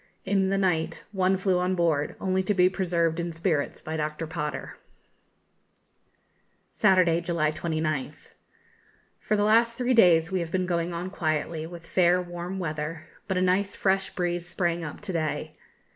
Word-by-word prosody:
In 190 -1 +2
the 195 - +1
night 180 -5 0
one 190 -1 +2
flew 185 -1 +1
on 180 +1 0
board, 160 -4 +1
only 190 -1 +1
to 200 +2 0
be 180 0 +5
preserved 170 -3 0
in 170 0 -2
spirits 165 -3 -1
by 160 +1 -4
Dr. 150 +1 -3
Potter. 155 -2 -5 1.9
Saturday, 185 -5 +3
July 165 -3 0
29th. 155 -3 -3 0.9
For 215 - 0
the 205 - +2
last 230 +2 +3
three 250 0 +1
days 175 -6 +5
we 190 - 0
have 170 -2 -3
been 185 +2 0
going 170 -1 -1
on 175 +2 -4
quietly 160 -2 -2
with 170 -1 -10
fair, 180 +1 +3
warm 175 +1 -5
weather, 155 -2 -4 0.2
but 190 - -1
a 185 - +2
nice 195 +2 +1
fresh 195 0 +1
breeze 175 -1 -2
sprang 175 -2 -1
up 150 - -7
to 205 -3 -4
day. 160 -2 -2
175 Hz, 160 wpm, -26 LUFS, 165-190 Hz, 1.9 s, be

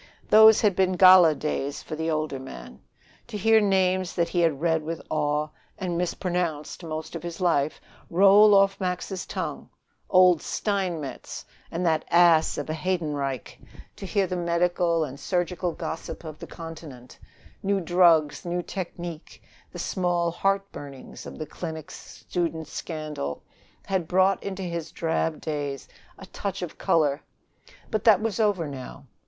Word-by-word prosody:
Those 220 0 +8
had 205 -4 +3
been 185 0 +2
gala 185 -3 +7
days 145 -1 -3
for - - -6
the 160 +1 -2
older 155 -3 -2
man. 65 - -10 0.5
To 225 -3 -5
hear 220 +1 +4
names 185 -2 +1
that 170 -1 +1
he 175 - -1
had 165 -5 +2
read 160 0 +1
with 165 +1 -5
awe, 150 0 0 0.3
and 180 -3 -3
mispronounced, 175 -2 -2
most 155 -1 -6
of 165 - -5
his 170 +1 -7
life, 155 -5 +1 0.3
roll 200 +3 +6
off 195 0 +4
Max's 180 +1 -3
tongue - - -5 0.4
"Old 180 -3 +5
Steinmetz" 180 -9 -3 0.2
and 175 +2 -3
"that 160 -2 +2
ass 170 -2 +4
of - - -4
a 155 - -2
Heydenreich"; 150 -6 -3 0.4
to - - -7
hear 200 0 +1
the 185 0 -3
medical 170 -1 +1
and 140 -2 -6
surgical 180 -1 -1
gossip 160 - -6
of 155 -2 -9
the - - -8
Continent, 155 -7 -10 0.4
new 200 0 +1
drugs, 170 -4 +3
new 175 0 -2
technique, 175 -2 -7 0.3
the - - -9
small 175 -2 0
heart 195 +3 0
burnings 140 -2 -10
of - - -9
the 155 - -5
clinics, 160 0 -8
student 165 -2 -2
scandal 155 - -5 0.4
had 190 -4 -1
brought 190 +1 +3
into 195 -1 -5
his 170 -2 -4
drab 160 -1 -1
days 145 -3 -4 0.3
a - - -11
touch - - -5
of - - -7
color. 150 -3 +2 0.7
But 215 -3 -1
that 215 -5 +7
was 220 -2 -2
over 205 -7 +1
now. 140 0 -9
170 Hz, 150 wpm, -26 LUFS, 155-185 Hz, 0.7 s, Those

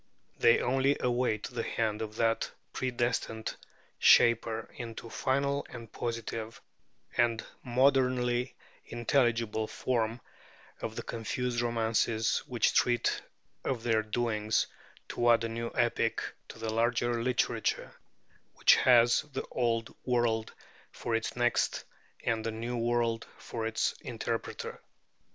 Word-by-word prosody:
They 115 - +5
only 135 +2 +2
await 120 -3 0
the 120 -2 -3
hand 110 -2 -1
of 110 -1 -5
that 115 0 +1 0.2
predestined 120 -3 -1 0.4
shaper 115 -1 +5
into 115 -1 -7
final 140 +1 0
and 115 -3 -9
positive 115 -1 -4 0.6
and 115 -2 +2 0.2
modernly 125 -1 +2 0.3
intelligible 120 -2 +1
form 115 -1 -1 0.6
of 110 - -4
the - - -4
confused 120 +2 -2
romances 115 -1 +1
which - - +2
treat 120 -2 +2 0.4
of 125 -4 -2
their 115 -2 +2
doings, 110 -1 0 0.4
to 120 0 +1
add 115 -1 +4
a 115 - -1
new 115 +1 -3
epic 120 -1 +1 0.3
to - - -10
the 110 -1 -3
larger 120 +1 +1
literature 125 +1 0 0.6
which - - +6
has 120 -2 +5
the 130 - -3
Old 115 -2 0
World 120 -3 +1 0.4
for 120 - -4
its 115 -1 0
text 120 0 0 0.4
and 115 -1 0
the 115 - -1
New 115 +2 -4
World 115 -1 0
for 115 -1 -4
its 110 0 0
interpreter. - - -4
115 Hz, 120 wpm, -30 LUFS, 115-120 Hz, 0.6 s, which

